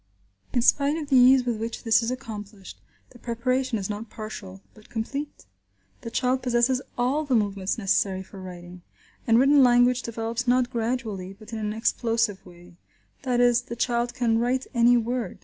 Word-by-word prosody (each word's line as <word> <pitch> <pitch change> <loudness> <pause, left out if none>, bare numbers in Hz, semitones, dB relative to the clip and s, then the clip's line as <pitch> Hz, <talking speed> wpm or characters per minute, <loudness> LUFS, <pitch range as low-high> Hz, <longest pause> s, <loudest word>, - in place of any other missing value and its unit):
In 245 - +1
spite 285 +4 +3
of 300 -3 -6
the 270 - +3
ease 255 0 +6
with 235 -3 -2
which 225 +1 -5
this 225 0 +4
is 230 - -2
accomplished, 210 -6 -8 0.3
the 245 - -16
preparation 250 +1 -1
is 195 -2 -4
not 210 +1 -6
partial, 200 -3 -9
but 215 -1 -19
complete. 275 - -5 0.6
The 230 - -6
child 255 +2 0
possesses 245 +1 +1 0.2
all 260 +5 +1
the 275 -4 0
movements 200 -2 -1
necessary 195 -2 0
for 190 0 -12
writing. 180 -1 -10 0.5
And 230 0 +5
written 275 +3 +5
language 245 0 +4
develops 230 +1 -4
not 245 0 +2
gradually, 225 -6 -3
but 215 +3 -14
in 225 - -3
an 210 -1 -2
explosive 225 -2 0
way; 175 0 -16 0.4
that 250 -3 0
is, 245 0 +4
the 235 -1 -8
child 240 0 -1
can 230 -2 +1
write 250 +2 0
any 240 0 +5
word. 240 +1 -3
235 Hz, 175 wpm, -25 LUFS, 215-250 Hz, 0.6 s, ease